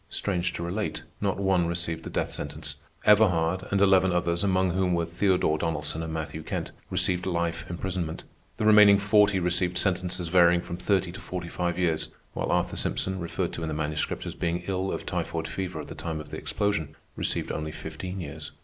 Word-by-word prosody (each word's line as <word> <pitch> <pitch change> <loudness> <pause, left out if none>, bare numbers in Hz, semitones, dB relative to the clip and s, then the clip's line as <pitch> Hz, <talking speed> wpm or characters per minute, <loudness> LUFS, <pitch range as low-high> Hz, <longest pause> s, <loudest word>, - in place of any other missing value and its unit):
Strange 90 -3 0
to 85 - -5
relate, 95 +5 -3 0.2
not 100 -2 0
one 95 -3 +2
received 85 -1 -1
the - - -6
death - - -1
sentence. - - -5 0.3
Everhard 95 -4 +4
and 100 - +1
eleven 95 -1 +5
others, 85 0 +1
among 95 -2 +2
whom 90 0 +1
were 85 -1 +1
Theodore 85 -2 +1
Donnelson 80 -1 -2
and 80 0 -4
Matthew 80 0 -4
Kent, 80 - -4 0.2
received 90 0 0
life 85 -2 -1
imprisonment. 85 -2 -3 0.3
The - - -1
remaining 105 -2 +8
forty 105 -1 +4
received 90 0 +1
sentences 90 -2 0
varying 85 0 +5
from 85 - -6
thirty 95 -1 +1
to 95 - -9
forty 90 -2 -5
five 85 -1 -1
years; 85 -4 +1 0.3
while - - -2
Arthur - - +1
Simpson, 95 0 0
referred 85 -1 -2
to - - -4
in 80 - -2
the 80 - -2
Manuscript 75 0 -2
as - - -4
being 85 +1 -2
ill 95 0 -1
of - - -4
typhoid - - -2
fever 95 -2 -4
at - - -9
the - - -7
time 80 -2 -4
of 75 - -9
the - - -4
explosion, 100 -7 -1 0.2
received - - -1
only 75 0 -3
fifteen 80 +5 -6
years. 75 -2 -6
90 Hz, 195 wpm, -27 LUFS, 85-95 Hz, 0.3 s, remaining